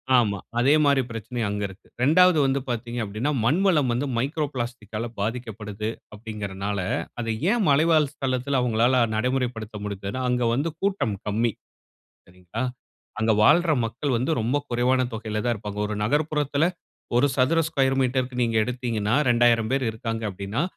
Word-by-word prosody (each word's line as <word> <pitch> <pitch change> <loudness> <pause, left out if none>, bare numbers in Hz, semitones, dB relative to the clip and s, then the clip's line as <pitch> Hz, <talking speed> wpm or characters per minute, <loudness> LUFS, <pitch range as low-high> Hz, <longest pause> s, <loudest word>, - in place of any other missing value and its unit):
ஆமா. 105 -5 +3 0.2
அதே 135 +4 +4
மாரி 140 -2 +4
பிரச்சனை 115 +2 -6
அங்கு 105 0 -2
இருக்கு. 95 +1 -15
2வது 165 +7 +5
வந்து 135 +1 +1
பார்த்தீங்க 120 0 -3
அப்டின்னா, 110 +8 -2
மண்வளம் 155 0 +3
வந்து 125 +4 -1
மைக்ரோ 145 +5 0
பிளாஸ்டிக்கால 120 -3 -4
பாதிக்கப்படுது. 110 -1 -4 0.3
அப்டிங்கறனால 100 -2 -4 0.4
அதை 115 -1 -1 0.2
ஏன் 235 -2 +2
மலைவாழ் 155 +1 +4
ஸ்தளத்துல 130 0 -1
அவங்களால 120 +1 +3
நடைமுறைப்படுத்த 120 -2 -2
முடிந்துன்னா, 100 +4 -4
அங்க 125 -1 +1
வந்து 140 +7 0
கூட்டம் 195 - 0
கம்மி. 110 +3 +1 0.8
சரிங்களா, 90 +5 -7 0.6
அங்க 110 0 +3
வாழ்ற 165 +8 +5
மக்கள் 130 +4 -2
வந்து 125 +6 -1
ரொம்ப 120 +6 0
குறைவான 125 +2 +2
தொகையில 110 -1 -3
தான் 120 -1 +1
இருப்பாங்க. 105 -1 -6
ஒரு 105 - -3
நகர்ப்புறத்துல 145 +2 +1 0.5
1 125 +4 +5
சதுர 140 +5 +3
ஸ்கேயர் 135 -3 +1
மீட்டர்‌க்கு 125 0 -1
நீங்க 115 -1 0
எடுத்தீங்கன்னா, 120 -3 -1
2000 120 -2 +3
பேரு 135 -1 +1
இருக்காங்க 115 0 -4
அப்டின்னா 100 +7 -3
120 Hz, 140 wpm, -25 LUFS, 110-135 Hz, 0.8 s, 2வது